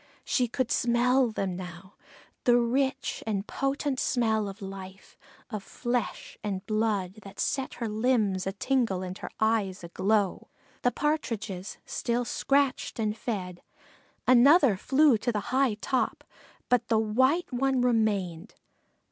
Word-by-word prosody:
She 250 -2 +1
could 240 +1 -2
smell 245 +2 +3
them 195 -4 -2
now 180 +1 -9 0.5
the 240 -1 +6
rich 265 +3 0
and 200 -2 -1
potent 275 +1 -1
smell 220 -4 +1
of 195 +2 -10
life, 195 0 -9 0.4
of 210 -3 -3
flesh 240 +3 -3
and 195 -2 -3
blood, 215 -3 -1
that 195 -1 -12
set 270 -2 -1
her 235 - -3
limbs 215 -4 +1
a - - 0
tingle 210 -3 0
and 185 0 -5
her - - -6
eyes 220 -5 +1
a 170 - -7
glow. 195 +1 0 0.3
The 245 - +3
Partridges 225 -10 -2
still 240 +1 -1
scratched 275 +2 0
and 215 -2 -1
fed; 185 -7 -4 0.7
another 255 - +6
flew 270 +3 +4
to 240 +3 0
the 210 - -1
high 260 -4 +3
top, 255 +4 -1 0.4
but 245 -1 +2
the 225 - +2
white 260 +9 +2
one 265 +1 +1
remained. 210 -7 0
225 Hz, 140 wpm, -28 LUFS, 195-255 Hz, 0.7 s, the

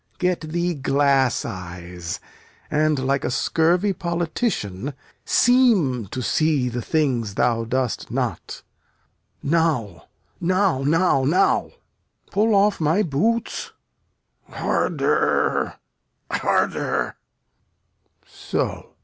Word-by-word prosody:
Get 180 -1 0
thee 170 +2 -1
glass 140 -2 +2
eyes 90 -3 -6 0.5
And, 155 0 +2
like 140 +1 +1
a - - -1
scurvy 170 +9 +2
politician, 165 - -2 0.3
seem 205 - +3
To 125 +6 -5
see 145 +2 +1
the 120 0 -4
things 125 -9 0
thou 115 -2 +1
dost 125 0 -2
not. - - -3 0.8
Now, 145 - 0 0.3
now, 185 -4 +1
now, 150 -1 +2
now! 180 +8 +2 0.6
Pull 210 +2 +2
off 200 -1 +3
my 160 +7 +2
boots. 220 +10 -1 0.8
Harder, - - 0 0.6
harder! - - 0
150 Hz, 85 wpm, -22 LUFS, 125-180 Hz, 0.8 s, seem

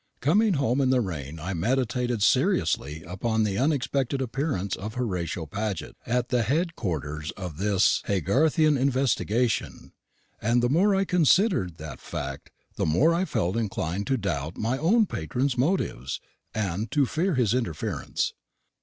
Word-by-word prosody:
Coming 200 - +3
home 135 -1 +1
in 130 - +2
the 130 -1 +4
train 80 - -4
I 90 +5 -4
meditated 120 +3 0
seriously 75 -4 +1
upon 110 +6 -1
the 100 -1 0
unexpected 140 -1 0
appearance 125 - -2
of 105 +3 -7
Horatio 90 -8 -2
Paget 100 +4 -4
at 125 0 0
the 125 -1 +2
head 160 - 0
quarters 75 - -3
of 90 -6 -6
this 100 0 +2
Haygarthian 140 - +2
investigation; 125 -3 0 0.5
and 120 +2 +2
the 120 - +3
more 190 +8 +3
I 195 0 +2
considered 180 - +3
that 75 -4 -8
fact, 70 +1 -6 0.3
the - - +1
more 140 - +4
I 175 +3 +1
felt 90 - -1
inclined 100 -4 -2
to 135 - +2
doubt 85 - -3
my 120 +5 -1 0.3
patron's 125 - -1
motives, 130 - -1 0.3
and 105 0 -2
to 145 +3 +2
fear 165 +6 0
his 120 -5 +2
interference. 115 -12 -2
115 Hz, 145 wpm, -26 LUFS, 90-135 Hz, 0.5 s, the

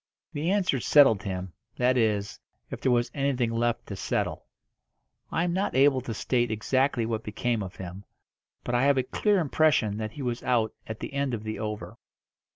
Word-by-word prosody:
The 155 +3 -1
answer 185 -9 +1
settled 120 -5 +5
him 95 -3 -5 0.2
that 125 +1 +2
is, 105 -4 0 0.3
if - - -6
there 130 - +2
was 120 -1 +1
anything 135 -4 0
left 115 0 0
to - - -6
settle. - - -2 0.8
I 165 - +1
am 175 -1 0
not 190 -4 -1
able 135 0 +4
to 120 -2 -5
state 120 +2 0
exactly 120 +3 +1
what 110 -1 -2
became 115 +2 -2
of 95 -2 -6
him, 95 +2 -8 0.6
but 120 - -3
I 120 - +3
have 140 -1 +4
a 130 - +2
clear 205 - +1
impression 150 - +2
that 110 0 -4
he 145 - -6
was 120 -1 -2
out 115 -4 +1
at 110 0 -6
the - - -6
end 140 -3 0
of 110 - -7
the 110 0 -4
over. 105 -1 -5
120 Hz, 190 wpm, -27 LUFS, 110-140 Hz, 0.8 s, settled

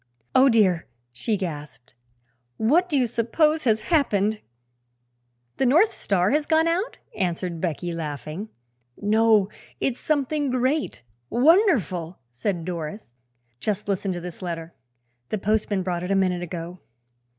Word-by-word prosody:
"Oh, 265 +1 +6
dear!" 195 -8 +3 0.3
she 210 - -1
gasped; 150 - -7 0.6
"what 325 +11 +3
do 295 - +2
you 255 - +3
suppose 275 +7 +1
has 220 -2 +3
happened?" 215 - +2 1.2
"The 265 - +2
North 335 - +5
Star 185 -1 +1
has 295 +1 +1
gone 320 0 +4
south," 350 +7 0 0.2
answered 175 -3 -2
Becky, 175 0 -2
laughing. 160 - -5 0.5
"No; 215 -1 +4 0.3
it's 260 -2 -1
something 290 -1 0
great 255 - 0 0.3
wonderful," 240 - +3
said 170 - -2
Doris. 170 - -5 0.5
"Just 210 -1 -2
listen 195 -1 -1
to 175 - -4
this 175 -1 -8
letter; 170 -2 -5 0.6
the 215 - -1
postman 210 -1 0
brought 175 -1 -2
it 180 - -4
a 195 - +2
minute 185 -2 +1
ago." 175 0 -6
205 Hz, 130 wpm, -24 LUFS, 175-260 Hz, 1.2 s, Oh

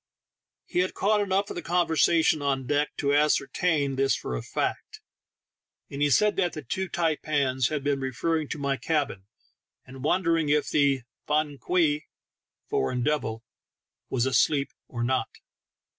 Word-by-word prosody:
He - - -2
had 185 +1 0
caught 210 +1 +2
enough 200 0 0
of - - -6
the 175 - -4
conver 175 +1 +1
sation 160 -1 +3
on 135 -2 0
deck 145 +3 +1
to 140 -1 +1
ascertain 145 0 +1
this 135 0 +2
for 60 - -4
a - - -3
fact, - - -3 0.9
and 140 - -5
he 145 - +3
said 210 +8 +3
that 180 -3 +1
the 155 - -6
two 190 +9 -3
taipans 145 -6 0
had 150 -3 -3
been 140 -1 0
referring 150 +4 -1
to - - -5
my 140 -1 -1
cabin, 140 -13 -2 0.6
and 130 0 -11
wondering 165 -1 +1
if 150 0 +1
the 140 -3 +2 0.2
"fan 150 -2 0
kwei" 155 -5 +1 0.3
— - - -61
foreign 120 - 0
devil 120 -7 -1 0.3
— - - -62
was 125 -2 +1
asleep 140 +2 +2
or 120 -1 -4
not. 130 +2 0
145 Hz, 160 wpm, -26 LUFS, 135-165 Hz, 0.9 s, sation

